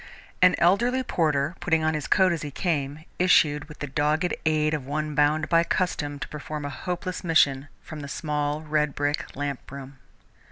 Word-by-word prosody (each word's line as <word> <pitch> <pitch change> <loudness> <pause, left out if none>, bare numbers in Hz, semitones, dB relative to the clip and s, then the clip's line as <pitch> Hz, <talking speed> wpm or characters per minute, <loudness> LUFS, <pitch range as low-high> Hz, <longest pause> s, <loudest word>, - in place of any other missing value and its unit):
An 180 0 +6
elderly 240 +9 +3
porter, 155 - 0
putting 160 -2 +1
on 160 0 +2
his 155 -1 -3
coat 190 -2 +4
as 165 -3 -2
he 150 - -4
came, 145 -1 -2
issued, 150 -5 +4
with 150 0 -13
the - - -1
dogged 150 +5 0
aid 155 0 +2
of 140 -4 -3
one 155 +1 -2
bound 150 +1 +2
by 165 0 +4
custom 150 -5 -1
to - - -6
perform 150 0 -6
a - - -3
hopeless 180 +3 -4
mission, 145 -5 +3 0.2
from 155 - -8
the 140 - -7
small, 150 0 -2
redbrick 150 -1 -1
lamp 140 -2 -5
room. 140 -1 -9
150 Hz, 175 wpm, -25 LUFS, 145-165 Hz, 0.2 s, An